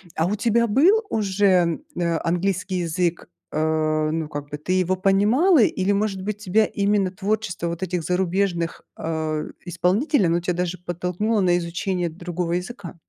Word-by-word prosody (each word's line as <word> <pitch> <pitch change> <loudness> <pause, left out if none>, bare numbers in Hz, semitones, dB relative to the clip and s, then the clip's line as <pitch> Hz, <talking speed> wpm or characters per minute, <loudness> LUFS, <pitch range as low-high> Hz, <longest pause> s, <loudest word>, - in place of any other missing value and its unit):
а 165 +2 +1
у 210 - 0
тебя 235 +2 +2
был 360 - +4
уже, 190 -5 +2 0.2
э, 170 -1 +1
английский 185 +2 -1
язык? 170 0 -1 0.3
Э, 155 0 +1
ну, 160 -1 -2
как 145 -1 -6
бы 145 - -5
ты 180 +5 -2
его 185 0 +2
понимала 210 - +3
или, 200 -1 +2
может 200 -2 0
быть, 210 +1 -3
тебя 210 +2 +2
именно 200 -2 +1
творчество 200 -3 -2
вот 170 +2 -4
этих 180 -2 -2
зарубежных, 180 -1 -1
а, 160 -1 -2 0.2
исполнителей, 185 - +1
оно 170 +1 +2
тебя 175 +1 -1
даже 180 0 -2
подтолкнуло 180 +5 -1
на 175 -1 +3
изучение 175 +1 -2
другого 175 +1 -4
языка? 180 0 -5
180 Hz, 155 wpm, -23 LUFS, 170-200 Hz, 0.3 s, был